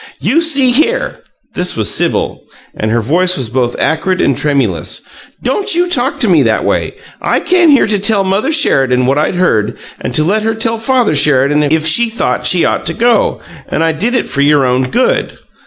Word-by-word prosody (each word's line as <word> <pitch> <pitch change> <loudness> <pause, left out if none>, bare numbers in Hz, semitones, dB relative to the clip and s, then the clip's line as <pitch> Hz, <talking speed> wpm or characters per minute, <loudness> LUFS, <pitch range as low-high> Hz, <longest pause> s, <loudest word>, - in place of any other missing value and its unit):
"You 325 +5 +1
see 275 -6 +2
here!" 465 - 0 0.3
This 180 0 -1
was 110 -2 +1
Sibyl, - - -1 0.3
and 110 - -3
her 115 +1 0
voice 180 +10 +1
was 125 -5 -3
both 120 0 -1
acrid 180 +4 -1
and 135 - +1
tremulous. 125 - -1 0.4
"Don't 370 - 0
you 350 +1 +1
talk - - -1
to - - +2
me - - +3
that - - 0
way! - - -2 0.3
I - - 0
came 355 -2 +2
here 280 -3 +4
to 210 -1 0
tell 200 0 +1
Mother 195 +9 -1
Sheridan 135 - +2
what 135 +3 +1
I'd 155 - -1
heard, 110 - 0 0.2
and - - -5
to 155 - +3
let 205 +7 0
her 225 +1 -2
tell 225 0 -2
Father 245 -4 +1
Sheridan 145 0 +3
if 155 +2 0
she 230 +9 +3
thought 230 - -2
she - - +2
ought - - -1
to, 235 -2 +1 0.3
and 160 - -1
I 165 - +1
did 210 +11 -2
it - - -1
for 140 - -2
your 145 -1 +3
own 130 +1 0
good." 255 - -1
180 Hz, 200 wpm, -12 LUFS, -, 0.4 s, here